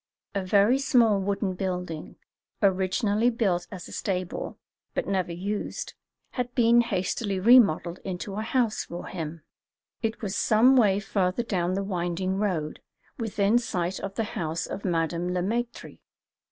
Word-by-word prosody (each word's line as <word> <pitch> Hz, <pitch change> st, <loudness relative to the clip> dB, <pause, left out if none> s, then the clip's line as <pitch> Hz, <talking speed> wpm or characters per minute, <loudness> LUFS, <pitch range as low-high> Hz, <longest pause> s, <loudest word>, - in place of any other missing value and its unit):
A 195 Hz, -, -1 dB
very 205 Hz, +7 st, +4 dB
small 235 Hz, -7 st, +4 dB
wooden 195 Hz, 0 st, -1 dB
building, 180 Hz, -4 st, -4 dB, 0.4 s
originally 200 Hz, +3 st, +2 dB
built 195 Hz, -7 st, 0 dB
as 185 Hz, -3 st, -8 dB
a -, -, -12 dB
stable, 185 Hz, -3 st, -3 dB, 0.4 s
but -, -, 0 dB
never 185 Hz, -3 st, -1 dB
used, 200 Hz, +5 st, -4 dB, 0.4 s
had 245 Hz, -1 st, -3 dB
been 235 Hz, -1 st, +5 dB
hastily 195 Hz, -2 st, -1 dB
remodelled 185 Hz, -6 st, +5 dB
into 185 Hz, +1 st, -5 dB
a 210 Hz, -, -3 dB
house 225 Hz, -1 st, 0 dB
for 170 Hz, +1 st, -7 dB
him. 160 Hz, -2 st, -6 dB, 0.6 s
It 225 Hz, 0 st, -2 dB
was 195 Hz, -1 st, -2 dB
some 235 Hz, +5 st, +5 dB
way 205 Hz, -6 st, +4 dB
further 195 Hz, +1 st, 0 dB
down 185 Hz, -5 st, -1 dB
the 195 Hz, -, -1 dB
winding 185 Hz, 0 st, -2 dB
road, 175 Hz, -7 st, -2 dB, 0.4 s
within 220 Hz, 0 st, +2 dB
sight 180 Hz, -5 st, -2 dB
of 195 Hz, 0 st, -6 dB
the 225 Hz, -, 0 dB
house 165 Hz, -5 st, -3 dB
of 200 Hz, -, -6 dB
Madame 170 Hz, 0 st, -1 dB
Le 180 Hz, -, +1 dB
Maître. 235 Hz, +5 st, -3 dB
195 Hz, 145 wpm, -27 LUFS, 180-220 Hz, 0.6 s, been